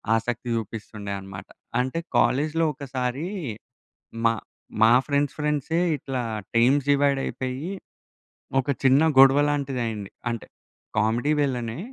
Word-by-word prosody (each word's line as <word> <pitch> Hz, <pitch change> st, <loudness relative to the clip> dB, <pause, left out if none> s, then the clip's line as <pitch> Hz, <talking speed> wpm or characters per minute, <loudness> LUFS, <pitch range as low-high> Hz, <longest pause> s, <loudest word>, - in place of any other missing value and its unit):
ఆసక్తి 120 Hz, +2 st, -2 dB
జూపిస్తుండే 110 Hz, -2 st, -5 dB
అనమాట. 95 Hz, -1 st, -9 dB, 0.3 s
అంటే, 130 Hz, +6 st, -1 dB, 0.2 s
కాలేజీలో 155 Hz, +5 st, +2 dB
ఒకసారీ, 130 Hz, +2 st, -3 dB, 1.0 s
మా 115 Hz, -, +5 dB, 0.5 s
మా 110 Hz, +1 st, +7 dB
ఫ్రెండ్స్ 145 Hz, -1 st, 0 dB
ఫ్రెండ్సే 150 Hz, +2 st, 0 dB, 0.2 s
ఇట్లా, 130 Hz, -1 st, -3 dB, 0.3 s
టీమ్స్ 130 Hz, +4 st, +4 dB
డివైడయిపోయి, 140 Hz, +1 st, 0 dB, 0.9 s
ఒక 135 Hz, -, -3 dB
చిన్న 135 Hz, +2 st, +5 dB, 0.2 s
గొడవ 135 Hz, +1 st, +8 dB
లాంటిదయింది. 125 Hz, -8 st, -2 dB, 0.2 s
అంటే, 115 Hz, -1 st, -5 dB, 0.5 s
కామెడీ 115 Hz, +7 st, +2 dB
వెల్లనే. 120 Hz, -4 st, -2 dB
130 Hz, 100 wpm, -25 LUFS, 115-145 Hz, 1.0 s, గొడవ